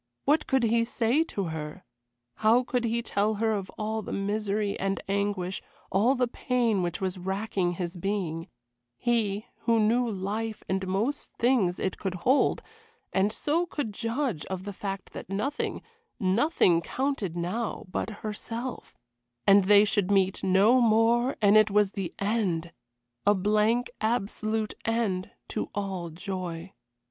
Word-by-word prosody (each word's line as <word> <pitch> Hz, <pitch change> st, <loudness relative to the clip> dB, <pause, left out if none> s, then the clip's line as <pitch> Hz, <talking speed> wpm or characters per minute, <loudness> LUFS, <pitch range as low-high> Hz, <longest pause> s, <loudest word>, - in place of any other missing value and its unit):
What 300 Hz, +3 st, +3 dB
could 265 Hz, -2 st, +2 dB
he 230 Hz, 0 st, +3 dB
say 245 Hz, +4 st, +2 dB
to 200 Hz, -, -3 dB
her? 160 Hz, +3 st, -6 dB, 0.5 s
How 230 Hz, +4 st, +4 dB
could 245 Hz, -1 st, -1 dB
he 235 Hz, +1 st, 0 dB
tell 215 Hz, 0 st, +1 dB
her 220 Hz, +1 st, +1 dB
of 200 Hz, -3 st, -2 dB
all 220 Hz, 0 st, -2 dB
the -, -, -7 dB
misery 205 Hz, 0 st, -1 dB
and 195 Hz, 0 st, -1 dB
anguish, 200 Hz, -2 st, -1 dB, 0.3 s
all 225 Hz, +8 st, +3 dB
the 250 Hz, -1 st, +1 dB
pain 235 Hz, -4 st, 0 dB
which 175 Hz, 0 st, -2 dB
was 185 Hz, -1 st, -2 dB
racking 190 Hz, -1 st, -1 dB
his 175 Hz, 0 st, -4 dB
being; 175 Hz, -4 st, -2 dB, 0.5 s
he, 215 Hz, -4 st, 0 dB, 0.2 s
who 230 Hz, -1 st, +4 dB
knew 235 Hz, +3 st, +3 dB
life 215 Hz, +2 st, -3 dB
and 190 Hz, 0 st, -1 dB
most 220 Hz, +10 st, -1 dB
things 230 Hz, -8 st, +2 dB
it 190 Hz, -, -2 dB
could 190 Hz, -3 st, -3 dB
hold, 255 Hz, +10 st, +2 dB, 0.5 s
and 195 Hz, +2 st, +2 dB
so 330 Hz, +9 st, 0 dB
could 275 Hz, -10 st, -3 dB
judge 230 Hz, -, -2 dB
of 190 Hz, -1 st, -4 dB
the 205 Hz, 0 st, -6 dB
fact 195 Hz, 0 st, -5 dB
that -, -, -8 dB
nothing, 210 Hz, +10 st, -2 dB, 0.4 s
nothing, 190 Hz, -, +3 dB
counted 250 Hz, -, -2 dB
now 195 Hz, +7 st, -3 dB
but 185 Hz, +2 st, -3 dB, 0.2 s
herself 230 Hz, +4 st, -5 dB, 0.5 s
and 195 Hz, -1 st, +6 dB
they 205 Hz, +1 st, +7 dB
should 205 Hz, -2 st, +1 dB
meet 195 Hz, -1 st, +2 dB
no 200 Hz, +7 st, +5 dB
more, 235 Hz, +3 st, +3 dB
and 205 Hz, +1 st, +6 dB
it 215 Hz, 0 st, +5 dB
was 205 Hz, -1 st, +3 dB
the 195 Hz, -5 st, -4 dB
end. 195 Hz, -6 st, -1 dB, 0.5 s
A 205 Hz, -, +6 dB
blank, 215 Hz, +5 st, +2 dB
absolute 215 Hz, -1 st, -1 dB
end 220 Hz, -5 st, 0 dB, 0.2 s
to -, -, -3 dB
all 190 Hz, -4 st, -3 dB
joy. 180 Hz, 0 st, -5 dB
205 Hz, 150 wpm, -28 LUFS, 190-230 Hz, 0.5 s, they